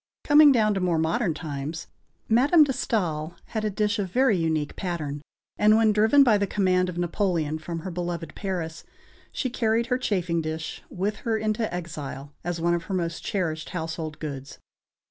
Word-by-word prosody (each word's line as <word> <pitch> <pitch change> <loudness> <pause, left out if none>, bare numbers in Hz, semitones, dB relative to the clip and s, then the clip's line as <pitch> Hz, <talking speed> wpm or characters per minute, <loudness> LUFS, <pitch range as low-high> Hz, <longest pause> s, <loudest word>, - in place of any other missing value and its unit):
Coming 295 0 +7
down 215 -5 +3
to 195 - -1
more 180 -3 +1
modern 165 +3 0
times, 150 0 -5 0.4
Madame 280 +8 +5
de 285 - 0
Staël 170 -10 -1
had 220 -2 -3
a 215 - +1
dish 210 +1 0
of 195 -2 -2
very 255 +1 +3
unique 160 -3 -1
pattern, 155 -6 -4 0.4
and, 215 +1 +6
when 225 -1 +4
driven 220 +7 +5
by 220 -6 +4
the 200 - 0
command 185 -2 +2
of 175 - -6
Napoleon 170 -3 0
from 165 +1 -5
her 185 - -5
beloved 175 -1 -4
Paris, 170 -5 -4 0.5
she 255 - -2
carried 230 -1 +1
her 250 - +1
chafing 180 -8 0
dish 160 0 -5
with 200 +3 -2
her 225 0 -1
into 215 +1 -1
exile 150 -5 -6
as 175 -1 -3
one 170 +1 +2
of 170 -1 -2
her 195 - -3
most 170 -2 -2
cherished 160 -5 -2
household 160 -1 -4
gods. 140 -3 -7
180 Hz, 180 wpm, -26 LUFS, 160-215 Hz, 0.5 s, Coming